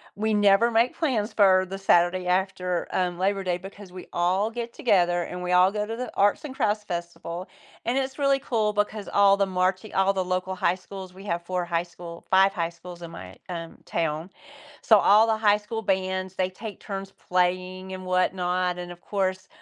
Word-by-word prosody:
we 215 +1 0
never 205 +3 +4
make 230 +2 +2
plans 240 -9 0
for 190 -2 +5
the 195 - -4
Saturday 180 -1 +3
after, 180 -1 0
um, 180 -1 -1
Labor 195 +1 0
Day 180 -1 0
because 195 0 -11
we 185 0 -10
all 185 +5 +1
get 235 0 -6
together 175 -6 +2
and 180 +1 -6
we 180 - -2
all 180 +2 +5
go 210 0 -2
to 225 +2 -5
the 250 0 -4
Arts 205 +7 +2
and 265 - -7
Crafts 210 -2 0
Festival, 175 0 -5 0.4
and 240 +3 0
it's 265 0 -2
really 275 -1 +2
cool 225 -6 0
because 205 0 -2
all 200 0 +5
the 200 - +2
marching 185 +2 -1
all 195 +1 +3
the 190 -1 0
local 185 +1 -2
high 175 -1 +2
schools, 190 0 -10
we 190 +2 -12
have 170 -3 -2
4 180 -1 -2
high 170 -1 0
school 170 -1 -11
5 190 +1 +6
high 170 -3 -1
schools 170 +1 -12
in 170 - -8
my, 95 - -10
um, 165 -2 -6
town. 165 +1 -2 0.5
So, 220 - +6
all 210 +3 +5
the 220 -1 +2
high 210 -1 +4
school 220 +2 -5
bands, 190 -1 -1
they 185 -1 0
take 205 +3 -8
turns 195 -1 -6
playing 185 +1 -1
and 185 0 -7
whatnot, 180 0 0
and, 175 0 -6
of 175 0 -12
course, 190 -2 -2
190 Hz, 200 wpm, -25 LUFS, 180-205 Hz, 0.5 s, 5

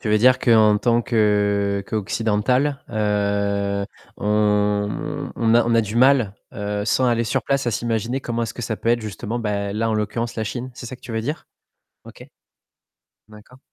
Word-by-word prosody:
Tu 110 - -4
veux 105 - +4
dire 125 +3 +5
que 120 - 0
en 105 -1 +5
tant 120 0 +2
que, 105 -3 +1
heu, 95 - -11
qu'occidental, 115 +6 0
heu, 100 -2 0 0.3
on 105 +6 0
on 115 -1 +2
a 120 - +5
on 120 - +1
a 115 - +5
du 110 +1 -4
mal, 125 -5 +4 0.2
heu 105 -3 -3
sans 130 +4 +2
aller 115 -1 +1
sur 130 +2 -1
place 140 0 0
à 120 - +2
s'imaginer 115 +3 -2
comment 120 -2 -3
est-ce 115 - -4
que - - -7
ça 110 -1 -2
peut 115 - -1
être 120 - +2
justement 110 +2 -5
bah 100 -3 -2
là, 110 +2 -1
en - - 0
l'occurrence 110 +2 -2
la 110 - -1
Chine, 125 +4 -5
c'est 120 - -8
ça 130 - -7
que - - -36
tu 125 - -9
veux 110 - -1
dire? 150 +7 -4 0.6
OK. - - -12 1.0
D'accord. 110 +4 -16
110 Hz, 195 wpm, -22 LUFS, 105-120 Hz, 1.0 s, dire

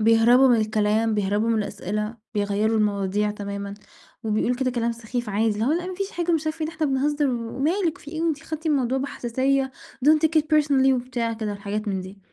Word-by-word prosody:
بيهرَبوا 230 +4 +6
من 240 - +5
الكلام، 215 +1 +1
بيهرَبوا 205 +2 0
من 225 -1 +2
الأسئلة، 210 +2 -3 0.2
بيغيَّروا 205 +2 +1
المواضيع 205 -1 +1
تمامًا، 200 -1 -5 0.5
وبيقولوا 220 +3 +1
كده 260 -1 0
كلام 235 -1 -1
سخيف 235 0 -5
عادي، 215 +2 +1
اللي 215 - -1
هو 280 - +2
لأ 350 +2 -1
ما 370 - -4
فيش 395 +2 -3
حاجة 345 0 -1
مش 315 -1 0
عارفة 310 +1 -3
إيه، - - 0
ده - - -6
إحنا 315 -1 0
بنهزّر 290 +2 +1
و 235 0 -4
مالِك 335 +4 0
في 295 - -11
إيه 320 +1 -3
وأنتِ 315 -4 0
خدتِ 315 +1 -6
الموضوع 265 -3 +1
بحساسية 265 +1 0 0.4
don't 310 0 +7
take 320 0 +2
it - - -5
personally 275 -3 +4
وبتاع 245 -2 -1
كده 220 -2 -3
الحاجات 205 +1 -4
من 190 -2 -1
دي، 185 +2 -10
235 Hz, 210 wpm, -24 LUFS, 210-285 Hz, 0.5 s, don't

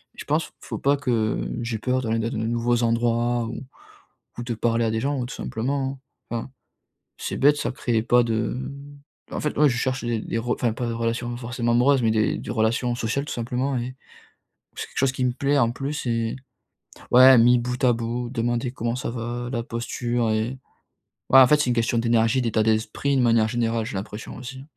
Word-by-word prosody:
Je - - -8
pense, - - -1
faut - - -6
pas 140 +1 +3
que 115 -6 0 0.2
j'ai 115 -1 -2
peur 130 +3 0
d'aller 115 -2 -1
dans 115 0 -1
les 110 +1 -1
nouveaux 120 +1 +1
endroits 120 +1 +1
ou 115 +4 -6 0.8
ou - - -3
de 120 0 -3
parler 115 +1 +1
à 110 - 0
des 110 0 -1
gens 140 0 -1
tout 125 - -7
simplement, 135 +3 -3 0.3
hein. 120 - -1
Enfin, 130 - -8 0.7
c'est - - -4
bête, 145 +2 +5
ça - - -2
crée 115 -3 -1
pas 120 +1 +4
de 115 +2 -2 0.6
en - - -3
fait, 150 - -2
ouais, 150 0 +5
je 120 - -1
cherche 130 +1 -1
des 120 -1 0
des 110 - -4
re 120 +2 -3
enfin 120 -3 0
pas 120 - -3
des 115 - -2
relations 115 +1 -2
forcément 120 -1 -2
amoureuses, 125 +2 +4
mais 110 - +3
des 110 -1 +1
des - - -6
relations 120 +2 +1
sociales, 120 +4 -1
tout - - -5
simplement 125 +3 -2
et 125 +2 -4 0.8
c'est - - -5
quelque - - -17
chose 135 -1 +3
qui 130 - -2
me 125 - +2
plaît 140 +3 +1
en 115 -3 +3
plus 140 +4 -4
et 115 -1 -1 0.8
ouais, 130 +1 +9
mis 120 +2 +6
bout 125 +1 -4
à 125 - +5
bout, 120 +1 -3
demander 120 0 -1
comment 120 -1 -2
ça 125 - -3
va, 120 +1 -4
la 120 -2 -1
posture 120 0 -2
et 110 +4 -1 0.7
ouais, 135 - +8
en 130 - +8
fait, 150 - +5
c'est 130 - 0
une 120 - +1
question 115 0 +1
d'énergie, 115 +2 +2
d'état 115 -2 +1
d'esprit 110 +6 0
de - - +3
manière 115 -2 +4
générale, 115 -1 -1
j'ai - - -6
l'impression 105 +3 -6
aussi. 130 +1 -8
120 Hz, 210 wpm, -24 LUFS, 115-130 Hz, 0.8 s, ouais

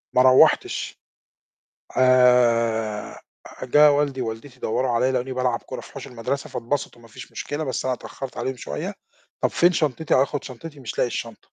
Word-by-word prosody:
ما 125 - +6
روّحتش. 130 0 +4 1.0
آآ، 115 -4 +3 0.4
جه 150 +4 +6
والدي 140 -2 0
ووالدتي 120 +3 -7
دوّروا 130 +3 0
عليَّ 125 +2 +2
لاقوني 130 +1 -2
بالعب 125 -2 -1
كرة - - -6
في - - -14
حوش - - -8
المدرسة 125 +4 -4
فاتبسطوا 120 -1 -3
مافيش 115 -1 -12
مشكلة، 145 +2 -4
بس 130 -4 -3
أنا 130 -1 +1
اتأخرت 130 +1 -8
عليهم 130 0 -3
شوية. 75 -11 -5 0.5
طب - - +2
فين 175 +1 +4
شنطتي، 155 -1 0
هاخد 140 +2 +1
شنطتي، 145 +3 -9
مش 125 - -7
لاقي - - +2
الشنطة. 115 -2 -5
130 Hz, 155 wpm, -23 LUFS, 115-140 Hz, 1.0 s, ما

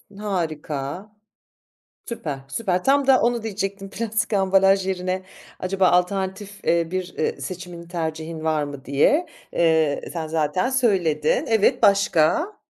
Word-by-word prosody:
Harika. 165 -3 -4 1.0
Süper, 150 - -5
süper. 180 +4 -1
Tam 275 0 +3
da 265 -1 +6
onu 235 -1 +1
diyecektim. 195 -2 -4
Plastik 220 0 -2
ambalaj 195 0 +3
yerine, 185 0 -2 0.4
acaba 190 0 +1
alternatif, 190 +3 -1
eee, 170 -1 +1
bir, 185 -1 -3
eee, 145 - -1
seçimin, 175 +2 -7
tercihin 160 -1 -4
var 155 -2 +1
mı, 140 -1 -7
diye. 150 - +3 0.3
Eee, 160 -3 +2
sen 165 -2 -3
zaten 160 - 0
söyledin. 190 - +1
Evet, 220 -2 +3
başka? 200 - +3
185 Hz, 125 wpm, -23 LUFS, 160-205 Hz, 1.0 s, da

